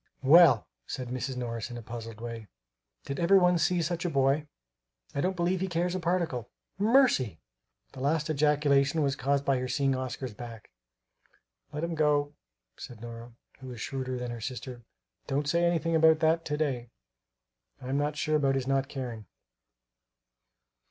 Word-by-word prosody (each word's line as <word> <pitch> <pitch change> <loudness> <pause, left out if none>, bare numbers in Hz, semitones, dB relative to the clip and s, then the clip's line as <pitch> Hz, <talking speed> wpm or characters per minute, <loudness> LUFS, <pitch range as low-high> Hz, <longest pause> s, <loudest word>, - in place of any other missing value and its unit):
"Well!" 145 -5 +7 0.2
said 130 -2 -5
Mrs. 130 +1 -3
Morris 115 -2 -4
in 120 - -7
a 120 - -8
puzzled 115 -1 -8
way, 115 -2 -6 0.6
"did 140 - -4
ever 180 +3 +5
one 180 -2 +4
see 175 +1 +2
such 170 +1 -2
a 175 - 0
boy? 140 +1 +2 0.7
I 140 - -1
don't 185 +3 0
believe 175 +1 0
he 190 - 0
cares 175 0 -1
a 185 - -1
particle 170 -9 -1 0.3
Mercy!" 210 - +3 0.5
The 135 - -11
last 150 +3 0
ejaculation 150 0 +2
was 140 -1 +1
caused 140 +1 0
by 135 -2 +2
her 130 - -3
seeing 135 +1 +1
Oscar's 130 -1 -4
back. 115 - -10 1.0
"Let 150 +2 -4
him 170 0 -2
go," 150 -2 +1 0.4
said 120 - -9
Nora, 115 +1 -9 0.3
who 130 - -10
was 125 -2 -8
shrewder 130 0 -3
than 125 -1 -4
her 120 -1 -7
sister; 125 +1 -6 0.5
"don't 145 +1 -1
say 170 +3 +2
anything 165 -1 +1
about 160 0 +6
that 165 +1 +2
to 150 -1 -2
day; 130 -6 -2 0.9
I'm 135 +2 -2
not 150 +1 -1
sure 155 0 +1
about 135 -2 +2
his 135 -2 -1
not 135 0 0
caring." 120 -6 -6
140 Hz, 165 wpm, -29 LUFS, 125-160 Hz, 1.0 s, Well